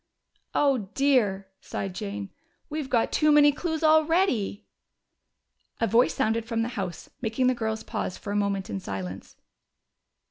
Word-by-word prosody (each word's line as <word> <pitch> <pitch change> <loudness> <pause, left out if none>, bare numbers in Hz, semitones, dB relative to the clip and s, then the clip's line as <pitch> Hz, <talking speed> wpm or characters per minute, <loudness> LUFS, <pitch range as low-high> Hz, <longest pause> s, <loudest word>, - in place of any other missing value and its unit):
"Oh, 260 -9 +2
dear!" 225 -9 +2
sighed 195 -2 -5
Jane. 200 0 -5 0.4
"We've 300 -3 -3
got 235 -2 +2
too 305 -1 +3
many 295 0 +7
clues 320 +2 -3
already." 315 - +3 1.1
A 230 - +2
voice 235 +2 +3
sounded 225 +1 +1
from 225 -1 -1
the 235 - -2
house, 185 -7 -5
making 230 +2 0
the 255 - +4
girls 220 -2 -3
pause 185 - -4
for 205 - -6
a - - -2
moment 200 -2 0
in 195 - -4
silence. 95 - -6
225 Hz, 145 wpm, -26 LUFS, 200-280 Hz, 1.1 s, many